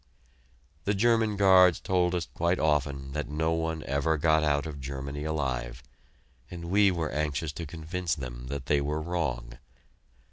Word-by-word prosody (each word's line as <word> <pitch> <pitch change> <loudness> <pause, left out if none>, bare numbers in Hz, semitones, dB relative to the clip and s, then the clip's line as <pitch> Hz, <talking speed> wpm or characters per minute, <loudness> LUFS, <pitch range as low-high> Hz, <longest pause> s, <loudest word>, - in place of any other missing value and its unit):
The 100 - +1
German 110 0 +2
guards 95 -3 +6
told 90 -1 +1
us 85 - -1
quite 85 +2 +1
often 70 -3 0
that 75 +1 -3
no 80 +2 0
one 80 -1 -2
ever 70 +4 0
got 80 +1 +3
out 75 -1 +1
of 75 -3 -6
Germany 70 +2 -5
alive, 65 -5 -3 0.7
and 85 -1 -7
we 100 0 +5
were 85 -4 -2
anxious 75 0 -1
to 80 +1 -6
convince 85 +2 -3
them 60 -3 -7
that 70 0 -5
they 70 +2 +2
were 75 +2 -1
wrong. 70 -8 -3
80 Hz, 155 wpm, -28 LUFS, 70-85 Hz, 0.7 s, guards